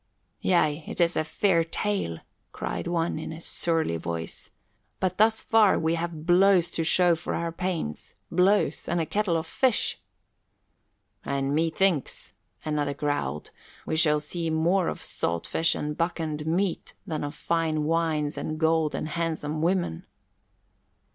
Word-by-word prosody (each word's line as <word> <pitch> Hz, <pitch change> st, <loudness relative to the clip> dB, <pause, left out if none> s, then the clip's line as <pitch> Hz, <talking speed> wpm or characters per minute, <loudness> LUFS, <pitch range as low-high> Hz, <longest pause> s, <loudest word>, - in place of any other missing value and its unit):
"Yea, 155 Hz, -4 st, +2 dB
it -, -, -6 dB
is 170 Hz, 0 st, +3 dB
a -, -, +1 dB
fair 170 Hz, +1 st, +2 dB
tale," 165 Hz, -, -2 dB, 0.4 s
cried -, -, -4 dB
one, 170 Hz, -2 st, 0 dB
in 160 Hz, -, -5 dB
a 160 Hz, -, -7 dB
surly 165 Hz, -, 0 dB
voice, 80 Hz, 0 st, -5 dB, 0.5 s
"but 185 Hz, 0 st, -1 dB
thus 220 Hz, +1 st, +4 dB
far 220 Hz, -3 st, +4 dB
we 160 Hz, 0 st, +1 dB
have 165 Hz, -2 st, -4 dB
blows 180 Hz, 0 st, +4 dB
to 165 Hz, -, -1 dB
show 175 Hz, +1 st, +4 dB
for 160 Hz, -, -4 dB
our 170 Hz, 0 st, -2 dB
pains 170 Hz, -, -4 dB, 0.2 s
blows 185 Hz, +4 st, +2 dB
and 175 Hz, -, +1 dB
a 165 Hz, -, 0 dB
kettle 175 Hz, +1 st, 0 dB
of 160 Hz, -, -3 dB
fish." 250 Hz, +7 st, +1 dB, 1.2 s
"And 140 Hz, 0 st, -1 dB
methinks," 165 Hz, 0 st, 0 dB, 0.3 s
another 145 Hz, -2 st, -1 dB
growled, 140 Hz, -, -2 dB, 0.3 s
"we -, -, -1 dB
shall 155 Hz, -2 st, +4 dB
see 165 Hz, +2 st, -4 dB
more 170 Hz, +4 st, +2 dB
of -, -, -4 dB
salt 85 Hz, 0 st, -2 dB
fish 165 Hz, +1 st, +1 dB
and 150 Hz, 0 st, -3 dB
buccaned 160 Hz, -3 st, -2 dB
meat, 180 Hz, +2 st, -1 dB
than 155 Hz, -3 st, -3 dB
of 145 Hz, +1 st, -4 dB
fine 160 Hz, -1 st, 0 dB
wines 155 Hz, -2 st, 0 dB
and 155 Hz, 0 st, -4 dB
gold 160 Hz, -1 st, +2 dB
and -, -, -3 dB
handsome 155 Hz, -1 st, -2 dB
women." 175 Hz, -, 0 dB
165 Hz, 150 wpm, -26 LUFS, 150-175 Hz, 1.2 s, thus